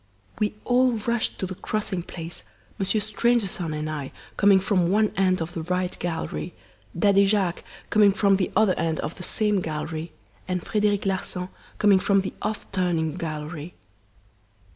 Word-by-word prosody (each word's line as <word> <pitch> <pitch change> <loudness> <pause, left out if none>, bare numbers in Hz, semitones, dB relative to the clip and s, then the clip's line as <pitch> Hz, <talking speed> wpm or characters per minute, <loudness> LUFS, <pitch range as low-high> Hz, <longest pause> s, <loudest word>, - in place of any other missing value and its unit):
We 210 0 0
all 250 0 +4
rushed 230 +1 -1
to - - -2
the 185 - -5
crossing 200 -1 -2
place 170 -1 -7 0.4
Monsieur 195 +2 +1
Stangerson 210 -5 0
and 150 0 -3
I 150 -3 -4 0.2
coming 200 -1 +6
from 185 -4 +2
one 210 +2 +3
end 185 -3 +2
of 170 +2 -8
the 165 - -3
right 180 +2 -1
gallery, 175 0 -3 0.4
Daddy 200 +2 +5
Jacques 195 -4 +1 0.3
coming 210 -1 +6
from 200 -1 +3
the 185 - -1
other 205 -2 +4
end 160 -1 0
of 155 - -5
the - - -9
same 210 0 +1
gallery, 155 0 -4 0.4
and 180 -2 -2
Frederic 210 -2 +1
Larsan 185 -1 -2 0.3
coming 205 -2 +5
from 195 +1 +3
the 190 - -5
'off 215 +1 -3
turning' 175 -5 0
gallery. 155 +1 -5
190 Hz, 160 wpm, -25 LUFS, 170-210 Hz, 0.4 s, coming